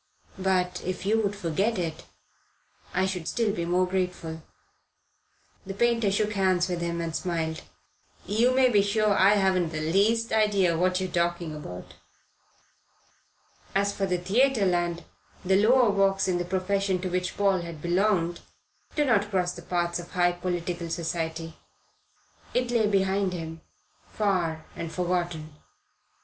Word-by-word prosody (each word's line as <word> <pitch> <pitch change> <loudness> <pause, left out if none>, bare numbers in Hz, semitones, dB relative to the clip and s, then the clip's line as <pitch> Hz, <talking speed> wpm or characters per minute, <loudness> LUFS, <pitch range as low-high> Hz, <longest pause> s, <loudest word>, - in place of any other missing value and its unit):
But 180 -1 0
if 185 +1 -4
you 220 +2 +2
would 205 -1 -1
forget 195 +4 -1
it 165 -3 -4 0.9
I 185 +1 +1
should 190 -2 -2
be - - -14
still 205 -7 0
more 180 +1 +2
grateful." 180 -3 -3 1.2
The 195 0 -7
painter 230 -2 +2
shook 210 +1 0
hands 185 -2 +2
with 175 -2 -3
him 170 0 -2
and 165 -1 -3
smiled. 165 -3 -2 0.6
"You 230 +5 +2
may 260 0 +4
be 210 -5 +4
sure 210 +1 +1
I 195 +2 +5
haven't 190 -4 +2
the 155 0 -3
least 225 +5 +2
idea 200 -5 +3
what 180 +2 +1
you're 185 - -1
talking 170 -2 -1
about." 90 -12 -8 1.8
As 200 +1 +2
for 195 -1 -1
Theatreland, 180 -3 +1 0.4
the 190 +2 +4
lower 245 -1 +5
walks 195 -1 +2
in 180 -1 +1
the 175 - -2
profession 190 +1 0
to 185 - -2
which 180 0 -2
Paul 195 -3 +2
had 170 -2 -7
belonged 175 0 +1 0.6
do 295 - +2
not 210 -5 +2
cross 180 -3 0
the 175 - -9
paths 175 0 -1
of 175 - -10
high 175 -1 +3
political 175 -1 -3
society. 165 -1 -3 1.0
It 250 -1 +1
lay 225 -3 +3
behind 195 -1 +1
him 165 -2 -6 0.5
far 175 -7 -1
and 165 -1 -5
forgotten. 175 -3 -2
185 Hz, 145 wpm, -27 LUFS, 170-200 Hz, 1.8 s, I